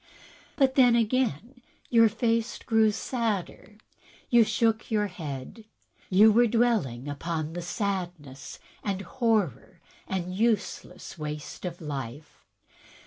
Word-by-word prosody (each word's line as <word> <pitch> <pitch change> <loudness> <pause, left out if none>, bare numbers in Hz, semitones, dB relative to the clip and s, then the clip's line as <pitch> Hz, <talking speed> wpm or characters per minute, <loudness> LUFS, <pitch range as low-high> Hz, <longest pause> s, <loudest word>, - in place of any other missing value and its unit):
But 270 -2 +3
then, 250 -3 +5
again, 235 - 0 0.3
your 230 -2 +6
face 230 +1 0
grew 220 -2 +3
sadder; 215 -2 -3 0.5
you 240 -1 +7
shook 225 0 0
your 210 -2 +1
head. 165 - -7 0.4
You 210 +4 +7
were 240 +3 +5
dwelling 210 - +1
upon 155 +2 -3
the 175 - -4
sadness 175 - -4 0.3
and 195 -1 -2
horror 200 - -1 0.3
and 180 -1 -3
useless 205 -5 -2
waste 150 +3 -6
of 175 0 -6
life. 140 -1 -7
205 Hz, 110 wpm, -27 LUFS, 165-230 Hz, 0.5 s, you